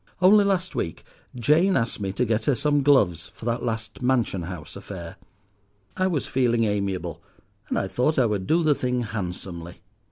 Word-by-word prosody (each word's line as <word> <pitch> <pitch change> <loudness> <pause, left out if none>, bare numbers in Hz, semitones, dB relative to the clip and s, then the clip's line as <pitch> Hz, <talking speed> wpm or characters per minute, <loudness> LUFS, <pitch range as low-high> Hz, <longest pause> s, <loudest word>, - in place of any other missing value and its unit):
Only 200 +3 +6
last 190 -2 0
week 80 - -3 0.3
Jane 155 - +3
asked 115 -1 -1
me 100 -2 -2
to 125 - 0
get 110 0 0
her 145 - +3
some 145 +4 +2
gloves 100 - +3
for - - -11
that 120 0 0
last 110 0 -4
Mansion 125 -7 +1
House 85 -3 -7
affair. 95 -4 -8 0.8
I 185 - +1
was 165 -7 -1
feeling 120 -3 +1
amiable, 100 -5 -2 0.5
and - - 0
I 95 - 0
thought 125 +10 0
I 130 - +4
would 105 -4 -1
do 170 +2 +3
the 155 -2 +4
thing 125 -2 -1
handsomely. 90 -5 -6
115 Hz, 180 wpm, -25 LUFS, 95-145 Hz, 0.8 s, Only